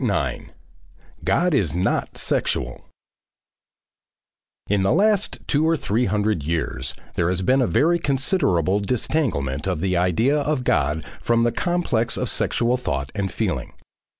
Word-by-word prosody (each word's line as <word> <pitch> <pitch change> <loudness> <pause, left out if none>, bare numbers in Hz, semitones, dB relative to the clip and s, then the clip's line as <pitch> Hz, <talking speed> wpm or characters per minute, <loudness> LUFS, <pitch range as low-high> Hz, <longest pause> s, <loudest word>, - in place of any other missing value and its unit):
9. 80 - -2 0.7
GOD 180 0 +2
IS 90 - +1
NOT 90 - -1
SEXUAL 60 0 -1 1.8
In 100 -1 +1
the 95 - +2
last 205 +2 +2
two 155 +2 +2
or 165 - +2
three 120 -1 0
hundred 105 -3 0
years 70 -5 -3 0.2
there 85 0 0
has 90 0 -1
been 130 +7 +3
a 125 - +2
very 170 +3 +2
considerable 130 - +1
disentanglement 100 - -1
of - - -1
the 90 +1 0
idea 90 - +2
of 145 -2 -1
God 75 - 0 0.2
from 115 0 +2
the 120 - +2
complex 150 -9 0
of - - -1
sexual 120 +2 +1
thought 70 - -3
and 100 -2 -2
feeling. - - -3
105 Hz, 140 wpm, -22 LUFS, 85-140 Hz, 1.8 s, been